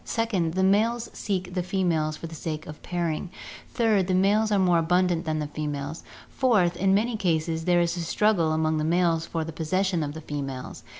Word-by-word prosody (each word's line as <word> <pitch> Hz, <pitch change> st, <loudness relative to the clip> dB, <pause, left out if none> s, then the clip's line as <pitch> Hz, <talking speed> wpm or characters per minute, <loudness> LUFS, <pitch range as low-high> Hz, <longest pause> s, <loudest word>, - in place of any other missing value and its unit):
Second, 195 Hz, -8 st, -1 dB
the 190 Hz, -, +2 dB
males 225 Hz, +5 st, +2 dB
seek 185 Hz, -3 st, -3 dB
the 180 Hz, -, 0 dB
females 170 Hz, -4 st, 0 dB
for -, -, -8 dB
the 165 Hz, -, -8 dB
sake 155 Hz, -1 st, -5 dB
of 150 Hz, -, -10 dB
pairing. 170 Hz, -1 st, -2 dB, 0.4 s
Third, 220 Hz, -6 st, +2 dB
the 185 Hz, -, +1 dB
males 210 Hz, +3 st, +3 dB
are 205 Hz, -, +3 dB
more 180 Hz, -3 st, +3 dB
abundant 175 Hz, 0 st, +1 dB
than 155 Hz, -1 st, -1 dB
the 150 Hz, -, -2 dB
females. 150 Hz, +1 st, -4 dB, 0.3 s
Fourth, 205 Hz, -10 st, +2 dB
in 195 Hz, +1 st, +2 dB
many 225 Hz, +3 st, +1 dB
cases 165 Hz, -4 st, -1 dB
there 175 Hz, -1 st, +4 dB
is 170 Hz, 0 st, 0 dB
a -, -, -4 dB
struggle 170 Hz, 0 st, +2 dB
among 155 Hz, 0 st, +1 dB
the -, -, -1 dB
males 165 Hz, 0 st, +1 dB
for 165 Hz, -1 st, -2 dB
the 165 Hz, 0 st, -7 dB
possession 180 Hz, +3 st, 0 dB
of 145 Hz, 0 st, -4 dB
the 160 Hz, -, -7 dB
females. 135 Hz, -4 st, -6 dB
175 Hz, 200 wpm, -26 LUFS, 160-190 Hz, 0.4 s, there